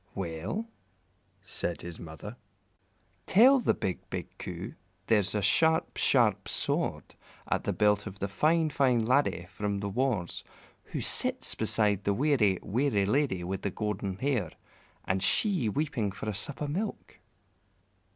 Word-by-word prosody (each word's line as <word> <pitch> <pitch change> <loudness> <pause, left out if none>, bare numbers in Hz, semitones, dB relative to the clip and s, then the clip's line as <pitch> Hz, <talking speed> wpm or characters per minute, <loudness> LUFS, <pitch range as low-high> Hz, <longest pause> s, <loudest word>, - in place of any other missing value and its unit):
"Well," 95 - -4 0.8
said 85 - -4
his 85 -1 -6
mother, 85 +7 -9 0.9
"tell 255 +8 +6
the - - +1
big, 95 -2 -2
big - - -6
Coo - - -6 0.3
there's 105 -3 +2
a 105 - 0
sharp, 160 - +3
sharp - - +2
sword - - 0 0.3
at - - -1
the - - +1
belt 105 0 +2
of 100 -1 -8
the 100 - -2
fine, 155 +10 +2
fine 125 -5 +2
laddie 125 -8 +2
from 100 -1 -2
the 100 0 -3
wars 105 -6 -1 0.4
who - - -5
sits - - +2
beside 105 -3 +1
the 100 - +2
weary, 120 -8 +3
weary 115 -3 +1
lady 105 -5 +1
with 95 +2 -4
the 100 - -1
golden 100 -1 -3
hair, 120 - 0 0.6
and 95 0 0
she 185 - +2
weeping 125 -5 -1
for 100 - -7
a 105 - -1
sup 135 +9 -4
o' - - -2
milk." 190 +9 -4
105 Hz, 145 wpm, -29 LUFS, 95-145 Hz, 0.9 s, tell